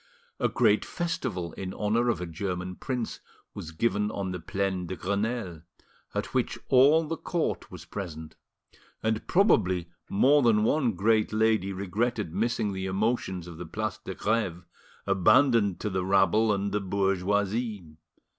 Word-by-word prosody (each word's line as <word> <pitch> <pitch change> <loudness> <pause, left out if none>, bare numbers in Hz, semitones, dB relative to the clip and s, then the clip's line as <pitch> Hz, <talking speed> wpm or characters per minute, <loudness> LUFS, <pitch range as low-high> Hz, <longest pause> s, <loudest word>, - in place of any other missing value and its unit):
A - - +2
great - - +3
festival 130 - -3
in 95 0 -6
honour 115 +3 +1
of 105 - 0
a 90 - -3
German 90 +2 -4
prince 125 +1 -4 0.3
was 80 - -7
given 105 +4 0
on 100 -3 -3
the 90 - -4
Plaine 95 +1 -2
de 95 - -4
Grenelle, 100 -3 -2 0.5
at - - -3
which - - 0
all 140 +5 +6
the 165 +1 -3
court 170 -3 -2
was - - -10
present; 80 -5 -7 0.7
and 110 0 -1
probably 95 - +3 0.2
more 140 +9 +4
than 110 -4 +4
one 125 -1 +2
great 110 +3 +2
lady 110 -3 +2
regretted 100 0 -2
missing 110 0 0
the 95 0 -3
emotions 95 -2 -1
of 85 -2 -10
the 90 - -5
Place 110 +5 -3
de 95 -3 -7
Greve, 100 -6 -1 0.4
abandoned 100 +1 +4
to 105 - -1
the 95 0 -1
rabble 100 +3 +3
and 100 0 -1
the 105 - 0
bourgeoisie. 100 -1 -1
100 Hz, 150 wpm, -28 LUFS, 90-115 Hz, 0.7 s, all